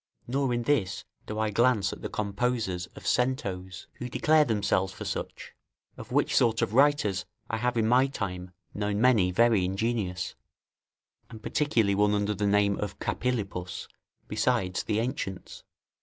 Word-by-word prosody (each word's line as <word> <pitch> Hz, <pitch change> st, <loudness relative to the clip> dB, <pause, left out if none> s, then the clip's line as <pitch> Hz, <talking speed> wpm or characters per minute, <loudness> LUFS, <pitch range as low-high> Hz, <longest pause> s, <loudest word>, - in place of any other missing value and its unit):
Nor 135 Hz, +1 st, 0 dB
in 120 Hz, 0 st, 0 dB
this 115 Hz, -9 st, 0 dB, 0.2 s
do 105 Hz, -, -4 dB
I 110 Hz, -1 st, 0 dB
glance 115 Hz, -2 st, +2 dB
at -, -, -10 dB
the -, -, -4 dB
composers 105 Hz, -3 st, -1 dB
of -, -, -11 dB
centos, 95 Hz, -8 st, -1 dB
who 125 Hz, -, -4 dB
declare 155 Hz, +3 st, +4 dB
themselves 100 Hz, -5 st, +1 dB
for -, -, -8 dB
such; -, -, -5 dB, 0.4 s
of -, -, -10 dB
which -, -, +2 dB
sort 115 Hz, -2 st, +3 dB
of -, -, -2 dB
writers 130 Hz, -8 st, +3 dB, 0.3 s
I 115 Hz, -, 0 dB
have 120 Hz, +1 st, -1 dB
in 110 Hz, -1 st, +2 dB
my 125 Hz, +3 st, +4 dB
time 90 Hz, -8 st, -5 dB, 0.2 s
known 105 Hz, 0 st, -1 dB
many 110 Hz, -6 st, +4 dB
very 110 Hz, +1 st, +3 dB
ingenious, 95 Hz, -2 st, -2 dB, 1.0 s
and 110 Hz, -1 st, -11 dB
particularly 115 Hz, -9 st, +1 dB
one 105 Hz, +1 st, +3 dB
under 105 Hz, 0 st, 0 dB
the 105 Hz, +1 st, -1 dB
name 100 Hz, 0 st, +2 dB
of 105 Hz, -3 st, -4 dB
Capilupus, 95 Hz, -8 st, -3 dB, 0.4 s
besides 105 Hz, -4 st, 0 dB
the 105 Hz, -, -1 dB
ancients. 110 Hz, -6 st, -4 dB
105 Hz, 155 wpm, -28 LUFS, 95-125 Hz, 1.0 s, declare